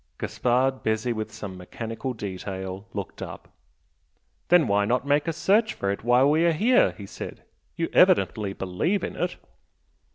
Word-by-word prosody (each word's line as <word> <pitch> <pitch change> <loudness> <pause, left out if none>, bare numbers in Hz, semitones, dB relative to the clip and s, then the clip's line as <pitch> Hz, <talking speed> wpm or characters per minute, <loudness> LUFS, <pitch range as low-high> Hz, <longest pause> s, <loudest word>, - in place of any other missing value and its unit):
Gaspard, 130 +2 0
busy 110 +2 0
with 110 -1 -4
some 105 -3 -7
mechanical 115 +7 -5
detail, 95 -1 -6
looked 100 -3 -6
up. - - -8 1.0
"Then 175 -1 +5
why 100 0 +3
not 120 +5 0
make 145 +3 +2
a - - +2
search 210 +8 +2
for 100 - -1
it 100 - -5
while 125 +3 +5
we 155 +3 +3
are 170 - +4
here?" 235 +10 +4
he - - -10
said - - -8 0.3
"You 165 -1 -1
evidently 115 - +4
believe 100 - -1
in - - -4
it!" - - -2
120 Hz, 160 wpm, -25 LUFS, 100-160 Hz, 1.0 s, Then